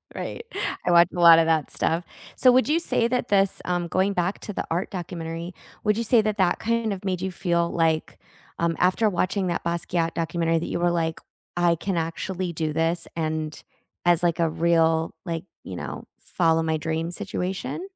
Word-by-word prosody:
Right. 465 - -5 0.4
I 175 - +2
watch 170 0 +7
a - - -3
lotta 165 -1 +8
that 160 -3 +1
stuff. 165 +2 0 0.3
So, 255 - +5
would 255 +3 +3
you 320 - +3
say 235 -8 +1
that 250 +1 -1
this 195 -1 +2
um, 175 -1 -1
going 190 +4 +1
back 180 +2 -1
to 210 - -6
the - - -2
art 170 +4 -2
documentary, 170 -1 -5 0.3
would 210 0 +2
you 230 - 0
say 230 0 +4
that 215 0 -1
that 180 -2 +2
kind 230 -2 0
of 195 +1 -8
made 185 -2 -1
you 190 0 -3
feel 170 -1 0
like, 160 -1 0 0.4
um, 170 -1 +1
after 185 +4 +3
watching 185 +1 0
that 170 - -2
Basquiat 170 0 -1
documentary 165 0 0
that - - -4
you - - -2
were 175 0 +2
like, 165 -1 -1 0.4
“I 175 -1 +4
can 175 +2 -2
actually 175 +2 -3
do 155 -1 -2
this” 165 +1 0
and 155 -1 -3 0.5
as, 175 -1 +4
like, 170 -1 +1
a 165 -1 +2
real, 165 0 +2
like, 165 +1 -4 0.2
you 95 - -7
know, - - -6
follow 165 -2 +1
my 160 -1 0
dream 160 +2 -2
situation? 195 - -4
170 Hz, 195 wpm, -24 LUFS, 165-190 Hz, 0.5 s, lotta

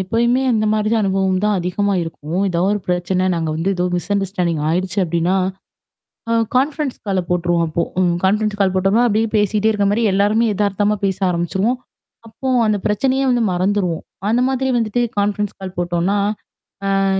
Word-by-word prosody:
எப்பயுமே 235 +6 +1
அந்த 215 -1 +1
மாரி 215 0 +1
தான் 225 - +2
அனுபவம் 190 -1 +1
தான் 210 -1 +2
அதிகமா 195 +3 0
இருக்கும். 165 +1 -4
ஏதோ 170 -2 -1
ஒரு 205 - -1
பிரச்சன 180 +1 0
நாங்க 165 -2 -2
வந்து 170 +4 0
ஏதோ 180 - 0
மிஸ்அண்டர்ஸ்டாண்டிங் 180 -4 -1
ஆயிடுச்சு 185 +4 -1
அப்ப்டின்னா, 170 +2 0 1.0
அ - - +3 0.2
கான்ஃபரன்ஸ் 280 +1 0
கால 195 -2 +1
போட்டுருவோம் 175 -1 +1
அப்போ. 165 +2 -1 0.2
ம் 175 -2 +2
கான்ஃபரன்ஸ் 210 +2 +1
கால் 190 -2 +2
போட்டோனா, 195 +6 +3
அப்ப்டடியியே 220 0 +1
பேசிட்டே 210 +1 +2
இருக்க 205 -2 0
மாரி 230 +3 +1
எல்லாருமே 205 +4 +2
எதார்த்தமா 205 +1 +1
பேச 190 -1 0
ஆரம்பிச்சுருவோம், 190 +7 0 0.5
அப்போ 260 +4 -5 0.2
அந்த 210 - +2
பிரச்சனையே 265 +6 +1
வந்து 245 -2 +2
மறந்துருவோம். 180 -2 0 0.3
அந்த 235 +3 +2
மாதிரி 265 0 -1
வந்துட்டு 230 +1 0 0.2
கான்ஃபரன்ஸ் 205 0 0
கால் 190 -1 -7
போட்டோம்னா, 175 +3 0 0.9
அ, - - +2
195 Hz, 160 wpm, -19 LUFS, 180-215 Hz, 1.0 s, அ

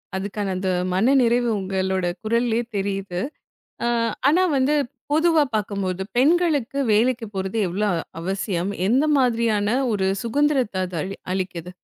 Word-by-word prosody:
அதுக்கான 200 +1 -3
அந்த 185 +1 -2 0.2
மனநிறைவு 240 +3 +3
உங்களோட 190 -1 -1 0.2
குரல்லே 230 +1 +1 0.2
தெரியுது. 195 -2 -2 0.7
அ - - +1 0.4
ஆனா 340 +6 +4
வந்து 270 +3 +2 0.4
பொதுவா 320 0 +4
பார்க்கும்போது 200 -3 -2
பெண்களுக்கு 290 -2 +2
வேலைக்கு 230 +2 +2
போறது 190 +3 -2
எவ்வளவு 185 -2 0 0.2
அவசியம்? 190 +1 -2 0.2
எந்த 260 +7 +3
மாதிரியான 230 -3 +1 0.2
ஒரு 190 -2 +1
சுகந்திரத்த 265 -2 +1
அது 180 - -7
அ - - -3 0.3
அளிக்குது? 180 -2 -4
210 Hz, 115 wpm, -23 LUFS, 190-250 Hz, 0.7 s, ஆனா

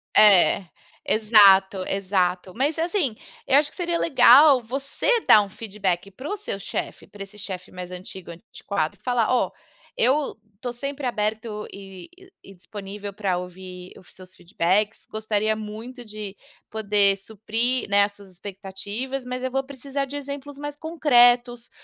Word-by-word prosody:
É, 200 -2 +6 0.4
exato, 200 -3 +5
exato. 185 -2 -1
Mas, 290 +6 -1
assim, 325 - 0 0.3
eu 270 - +5
acho 295 0 +2
que - - -18
seria 345 -1 -1
legal 275 -1 +6
você 275 - -1
dar 210 - +6
um 200 - -5
feedback 195 -3 -3
para 260 +9 -9
o 415 - -2
seu 295 - -5
chefe - - -5
para 200 -1 -9
esse 200 +2 -14
chefe 190 -3 -7
mais 180 0 -8
antigo, 180 -1 -9
antiquado, 170 -3 -4
e - - -35
falar: 245 -3 +1
"Ó, - - +1 0.5
eu 270 +2 +1 0.2
estou 240 +4 -5
sempre 275 +2 -5
aberto 215 -2 -2
e 195 -2 -11 0.3
e 195 - -13
disponível 200 +2 -8
para 195 -3 -1
ouvir 180 0 -9
os 185 - -20
seus 185 0 -14
feedbacks. 190 +4 -1
Gostaria 215 0 -1
muito 220 +4 -8
de 210 -2 -7 0.4
poder 205 -2 +3
suprir, 225 +5 -1
né, 200 0 +5
as 205 - -7
suas 200 -1 -13
expectativas, 200 +7 -6
mas 250 0 -5
eu 260 - -2
vou 270 +1 0
precisar 275 +1 -5
de 280 +2 -8
exemplos 280 0 -7
mais 290 0 -6
concretos 245 -7 +3
215 Hz, 155 wpm, -24 LUFS, 195-260 Hz, 0.5 s, É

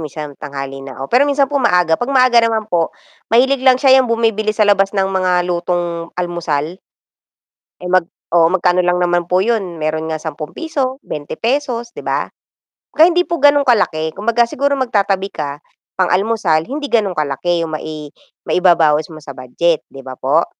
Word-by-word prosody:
minsan 150 -1 -7
tanghali 135 -1 -6
na 135 -2 -10
ako, 135 +1 -7
pero 250 +3 +5
minsan 280 0 +3
po 280 0 -2
maaga, 180 -8 +2
'pag 245 - -2
maaga 255 -3 +4
naman 225 -2 0
po 165 -2 +2 0.4
mahilig 260 +4 +3
lang 260 -1 +5
siya 265 0 +5
yang 255 - -1
bumibili 225 -2 0
sa 215 - +3
labas 200 0 +2
ng 195 - +2
mga 180 -2 +1
lutong 175 -1 -2
almusal. 175 -2 -3 1.0
Eh 180 - -5
mag 185 -1 +3 0.2
oo, 170 -1 +4
magkano 180 -1 +2
lang 180 0 +1
naman 175 -1 +1
po 180 +2 +1
yun, 195 -7 -2
meron 155 +1 -2
nga 155 - -5
₱10, 260 - -4
₱20, 235 - -3
'di - - -8
ba? - - -1 0.7
Kaya 320 +3 +6
hindi 355 +1 +1
po 340 - -1
gan'ong 290 0 +5
kalaki, 160 -10 +1
kumbaga 235 +4 +1
siguro 280 +3 -1
magtatabi 200 -6 0
ka, 140 0 -5 0.4
pang-almusal 185 -3 +1
hindi 285 - -5
ganon 210 - 0
kalaki 155 +4 -1
yung 155 -1 -5
mai 155 -1 -7 0.4
maibabawis 165 -4 +3
mo 155 - -10
sa 145 - -12
budget 155 +6 -1
'di 135 - -11
ba 130 -1 -7
po? 145 +6 +1
180 Hz, 170 wpm, -17 LUFS, 160-235 Hz, 1.0 s, Kaya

